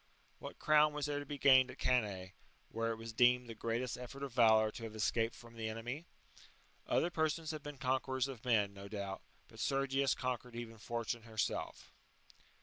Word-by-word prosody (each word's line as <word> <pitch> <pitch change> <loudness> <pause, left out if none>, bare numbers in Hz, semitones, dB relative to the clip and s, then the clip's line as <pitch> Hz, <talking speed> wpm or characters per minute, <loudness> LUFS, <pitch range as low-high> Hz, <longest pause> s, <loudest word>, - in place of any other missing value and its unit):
What - - -8
crown 150 0 +4
was 150 -1 -2
there 145 -1 -1
to 145 - -7
be 145 - -4
gained 130 -2 +6
at - - -9
Cannae, 100 -7 0 0.4
where 115 0 -1
it - - -2
was 115 0 -8
deemed 125 +1 +4
the 115 - -6
greatest 115 +2 -2
effort 135 +3 -7
of 135 -4 -5
valour 110 -3 +5
to 115 - -8
have 110 -1 -6
escaped^' 115 +1 0
from 120 -2 -13
the 110 -1 -3
enemy? 120 +8 -5 0.8
Other 175 - +2
persons 160 0 0
have 155 -1 -5
been 145 0 -8
conquerors 130 0 0
of 130 -4 -8
men, 105 -5 +2
no 100 0 -9
doubt, 100 -2 -5 0.3
but - - -15
Sergius^^ 135 0 +1
conquered 125 -2 -3
even 115 -2 -7
Fortune 115 +1 -3
herself. 110 -1 -3
120 Hz, 185 wpm, -36 LUFS, 115-135 Hz, 0.8 s, gained